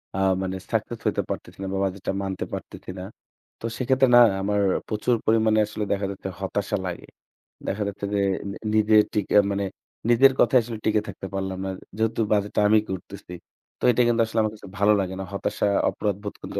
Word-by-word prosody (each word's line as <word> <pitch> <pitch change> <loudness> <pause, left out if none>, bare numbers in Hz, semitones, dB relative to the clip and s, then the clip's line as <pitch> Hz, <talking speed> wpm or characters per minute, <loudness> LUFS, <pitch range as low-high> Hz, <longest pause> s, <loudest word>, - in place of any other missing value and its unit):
আ 95 - -1 0.2
মানে 95 0 -2
সাকসেস 115 +1 -2
হতে 105 - +1
পারতেছি - - -6
না - - -3
বা - - -1
বাজেটটা 95 0 -3
মানতে 95 -1 -3
পারতেছি - - -8
না। - - -5 0.6
তো - - -7
সেক্ষেত্রে 130 +1 +3
না 120 - +10 0.2
আমার 100 +1 +1 0.3
প্রচুর 110 +3 +1
পরিমাণে 110 -1 +3
আসলে 105 0 -4
দেখা 100 0 -1
যাচ্ছে 95 0 -6
হতাশা 100 +2 -1
লাগে। 90 - -5 0.6
দেখা 105 +2 -1
যাচ্ছে 100 0 -4
যে, 100 - +2 0.3
নি - - -7 0.2
নিজের 110 0 +5
টিকা 105 -1 0 0.2
মানে 100 0 -1 0.4
নিজের 135 +3 +6
কথায় 130 - +5
আসলে 115 0 -6
টিকে 110 -1 +3
থাকতে 95 0 -7
পারলাম 95 -1 -3
না। 95 - -2 0.3
যেহেতু 110 +1 0
বাজেটটা 105 0 +1
আমি 110 +1 +5
করতেছি। 90 -1 -7 0.5
তো - - -17
এটা 125 - +2
কিন্তু 115 -1 +3
আসলে 115 0 -2
আমার 110 -1 0
কাছে 105 - -12
ভালো 105 +1 +5
লাগে 95 -1 -2
না। - - -3
হতাশা, 100 +1 -1 0.2
অপরাধবোধ 100 0 -3
কিন্তু - - -4
105 Hz, 190 wpm, -24 LUFS, 95-110 Hz, 0.6 s, না